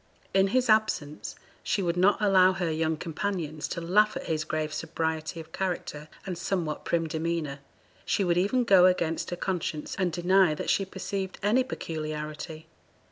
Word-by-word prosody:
In 195 0 +4
his 255 +5 +1
absence 215 -9 +1 0.3
she 200 - 0
would 170 -1 0
not 185 +3 +4
allow 190 -3 +5
her 180 -3 -1
young 160 0 0
companions 165 -2 -3
to 170 - -4
laugh 210 +5 +3
at - - -6
his 155 -1 -1
grave 155 -1 -2
sobriety 160 0 -3
of 160 - -10
character, 175 -5 -3 0.2
and 180 -3 -4
somewhat 175 -4 -2
prim 165 -1 +1
demeanour; 160 -3 -2 0.4
she 200 - +1
would 175 -2 +2
even 225 +7 +2
go 190 -5 +7
against 170 -3 0
her 175 - -3
conscience, 175 -4 -3
and 185 -2 +1
deny 180 -1 +3
that - - -1
she 195 - +1
perceived 190 0 -4
any 225 +6 +3
peculiarity. 155 -4 -5
175 Hz, 165 wpm, -28 LUFS, 160-195 Hz, 0.4 s, go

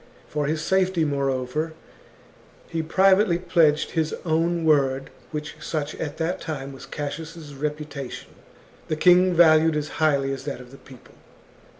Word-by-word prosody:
For 150 -1 -2
his 155 +1 -1
safety, 185 -2 +2
moreover, 140 +2 -1 0.9
he 165 -1 -2
privately 190 +3 +4
pledged 165 -4 +2
his 160 -1 -1
own 165 +1 +1
word, 135 -3 +2 0.2
which, 150 -1 -6
such 155 -1 -3
at 145 -1 -5
that 165 +2 -2
time 140 -4 -5
was 135 - -11
Cassius' 155 +1 -6
reputation, 150 -2 -5 0.6
the 155 - -1
king 180 +2 +5
valued 160 -1 +6
as 150 0 -2
highly 140 -3 +2
as 135 -1 -6
that 140 -3 -4
of 125 0 -13
the 135 - -12
people. 130 -2 -16
155 Hz, 140 wpm, -24 LUFS, 140-165 Hz, 0.9 s, valued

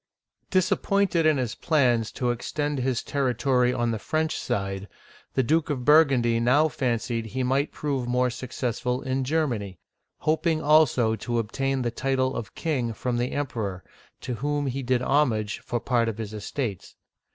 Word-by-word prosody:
DISAPPOINTED 185 -2 +2
in 155 -2 +4
his 125 -4 -1
plans 125 -8 +2
to 125 -1 0
extend 145 +4 -2
his 130 -1 -1
territory 125 -2 +1
on 120 -2 0
the 110 - -2
French 155 +7 -1
side, 100 0 -3 0.5
the 130 - +3
Duke 160 +5 +1
of 130 -4 -2
Burgundy 135 -7 +5
now 130 +7 +4
fancied 120 -4 -1
he 130 +4 -2
might 135 +3 +1
prove 135 -4 -2
more 125 0 +1
successful 125 0 -3
in 130 0 -1
Germany, 125 - -1 0.4
hoping 160 +1 +1
also 145 -7 +4
to 120 +3 -2
obtain 135 +4 -1
the 120 - -1
title 130 +1 0
of 110 - -6
king 130 -8 -1
from 120 +3 -2
the 120 +1 -1
Emperor, 110 -10 -3 0.4
to 125 - -4
whom 145 +5 -1
he 135 0 -2
did 125 -1 0
homage 115 -8 +1
for 120 - -3
part 115 -2 +1
of 110 - -5
his 110 -2 -5
estates. 105 -1 -4
125 Hz, 160 wpm, -26 LUFS, 115-145 Hz, 0.5 s, Burgundy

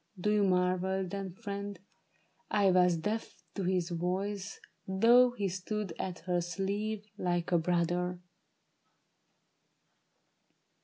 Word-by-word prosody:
Do 210 +4 +1
you 210 -1 +3
marvel, 185 0 +1
then, 195 0 -4
friend, 200 -2 -5 0.7
I 200 -2 +4
was 180 -1 +4
deaf 210 +7 -3 0.2
to - - -4
his 180 -1 0
voice, 190 +4 -2 0.3
though 235 +6 +6
he 205 -5 -1
stood 190 +1 -3
at 180 -2 -3
her 180 -1 0
sleeve 200 +5 -2
Like 175 -1 -1
a 175 - +4
brother 175 +1 0
190 Hz, 110 wpm, -32 LUFS, 180-205 Hz, 0.7 s, though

